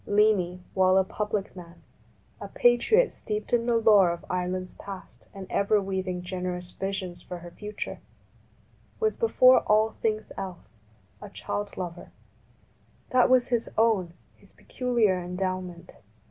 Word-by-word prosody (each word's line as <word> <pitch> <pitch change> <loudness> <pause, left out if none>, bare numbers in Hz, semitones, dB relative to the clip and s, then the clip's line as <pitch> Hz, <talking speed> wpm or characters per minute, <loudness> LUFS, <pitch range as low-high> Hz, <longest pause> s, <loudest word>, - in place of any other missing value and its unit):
Leainy, 205 -4 +2
while 185 0 +4
a 190 - +5
public 210 +1 -3
man, 170 -1 -12 0.6
a 200 - -7
patriot 245 - +3
steeped 210 +1 -5
in 235 0 +2
the 235 -1 +3
lore 210 -5 +5
of 170 0 -5
Ireland's 180 0 -2
past 185 - -11
and 195 -1 -8
ever 205 +1 +2
weaving 190 -2 -3
generous 180 -1 -4
visions 190 -3 -4
for 180 - -7
her 175 0 -11
future, 210 +3 -6 1.0
was 435 -1 +1
before 255 - +5
all 215 +1 +2
things 215 -1 -3
else 180 -10 -8 0.5
a - - -8
child 205 0 -5
lover. 175 -2 -6 1.0
That 255 -1 +4
was 255 -1 +4
his 240 -2 0
own, 205 -7 +2 0.2
his - - -21
peculiar 230 -7 0
endowment. 180 -1 -5
195 Hz, 135 wpm, -27 LUFS, 180-220 Hz, 1.0 s, a